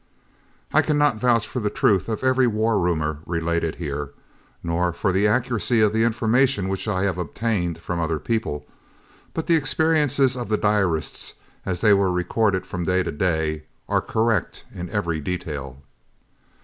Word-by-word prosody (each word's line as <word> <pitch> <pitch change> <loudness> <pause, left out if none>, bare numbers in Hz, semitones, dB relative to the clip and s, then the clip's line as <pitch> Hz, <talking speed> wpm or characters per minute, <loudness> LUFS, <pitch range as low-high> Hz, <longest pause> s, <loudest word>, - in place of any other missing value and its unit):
I 155 - +6
cannot 145 -5 +2
vouch 120 -2 +2
for 125 - -4
the 105 -3 0
truth 100 -1 +1
of 110 +3 -3
every 130 -1 +3
war 110 -1 +1
rumour 80 -4 0
related 85 -1 -1
here, 75 -3 -4 0.5
nor 85 +1 0
for 95 - 0
the 95 +3 +2
accuracy 115 +1 +1
of 105 -1 +3
the 110 0 +2
information 115 -2 +2
which 95 +3 -3
I 95 -3 0
have 95 -3 -1
obtained 90 -1 -2
from 85 +1 -4
other 80 -1 0
people, 110 -6 -2 0.7
but 160 - -2
the 170 - +4
experiences 145 -3 +2
of 120 -4 -5
the 105 - +2
diarist, 100 -7 0 0.3
as 90 -2 -2
they 105 -2 +6
were 100 -2 +3
recorded 95 +2 0
from 90 -2 -4
day 90 +2 +1
to - - -3
day, 80 -2 -1 0.2
are - - +1
correct 110 -3 -1
in 90 0 -6
every 85 -7 -1
detail. 70 -5 -5
100 Hz, 160 wpm, -23 LUFS, 85-115 Hz, 0.7 s, I